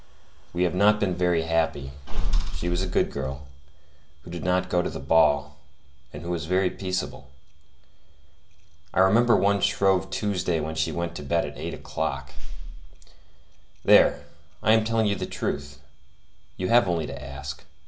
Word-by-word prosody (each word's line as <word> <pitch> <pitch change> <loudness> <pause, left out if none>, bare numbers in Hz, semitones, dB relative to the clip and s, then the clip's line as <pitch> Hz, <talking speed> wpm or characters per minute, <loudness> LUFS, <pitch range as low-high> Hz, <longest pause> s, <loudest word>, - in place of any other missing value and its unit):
We 90 +1 0
have 90 -2 +1
not 105 +3 +4
been 100 -3 +1
very 90 -2 +1
happy. 80 -4 0 0.6
She 85 - -3
was 85 +1 0
a 95 - -2
good 90 - +1
girl, 70 0 -5 0.8
who 85 - -11
did 85 - -6
not 90 0 +1
go 90 -1 +2
to - - -2
the - - -6
ball, 70 0 +3 0.5
and - - -9
who 85 - -4
was 85 -2 -2
very 90 +1 +2
peaceable. 70 -9 -4 1.7
I 95 - +5
remember 115 +5 +5
one 100 0 +2
Shrove 95 -1 +2
Tuesday 95 -5 -1
when 80 +1 -3
she 80 0 0
went 85 0 -3
to - - -6
bed 70 - 0
at - - -8
eight - - -4
o'clock. - - -4 1.5
There, - - +5 0.4
I 110 - +4
am 110 -1 +4
telling 110 -2 +1
the - - -3
truth; 70 0 -4 0.8
you 90 - -2
have 120 -4 +5
only 85 -3 0
to 70 -1 -7
ask. 70 0 -7
85 Hz, 160 wpm, -25 LUFS, 75-95 Hz, 1.7 s, I